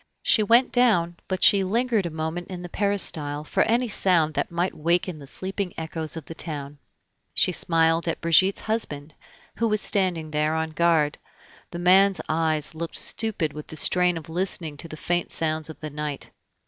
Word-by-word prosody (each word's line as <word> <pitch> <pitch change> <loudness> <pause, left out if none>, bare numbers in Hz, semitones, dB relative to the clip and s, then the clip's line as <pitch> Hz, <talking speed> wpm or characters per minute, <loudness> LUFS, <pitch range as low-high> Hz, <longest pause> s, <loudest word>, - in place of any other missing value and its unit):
She - - +4
went 235 +5 +4
down, 175 -9 +2
but 185 -1 -2
she 200 -1 +6
lingered 225 0 0
a - - -4
moment 160 +2 -4
in 180 -1 -7
the 175 - -7
peristyle 160 -8 0
for - - -1
any 240 +2 +2
sound 175 -7 +1
that - - -2
might 175 +2 -1
waken 170 +1 -1
the 140 - -12
sleeping 190 +4 -3
echoes 160 0 -2
of 160 - -8
the - - -8
town. 145 -3 -6 0.6
She - - +3
smiled 165 0 +2
at 165 - -2
Brigitte's 185 +4 +3
husband, 155 -10 -4 0.4
who 230 - +1
was 215 -1 +2
standing 180 -7 +1
there 150 +1 0
on 160 0 -2
guard; 160 -2 +1 0.5
the 170 - -7
man's 190 +2 +4
eyes 155 -1 0
looked 165 +1 -5
stupid 195 -9 -1
with 150 0 -9
the 155 - -9
strain 180 +3 +3
of 165 - -9
listening 165 -2 -2
to 165 - -6
the 155 - -9
faint 175 +2 -2
sounds 155 -1 -1
of 160 - -10
the 155 -1 -6
night. 150 -1 -5
170 Hz, 185 wpm, -24 LUFS, 155-190 Hz, 0.6 s, she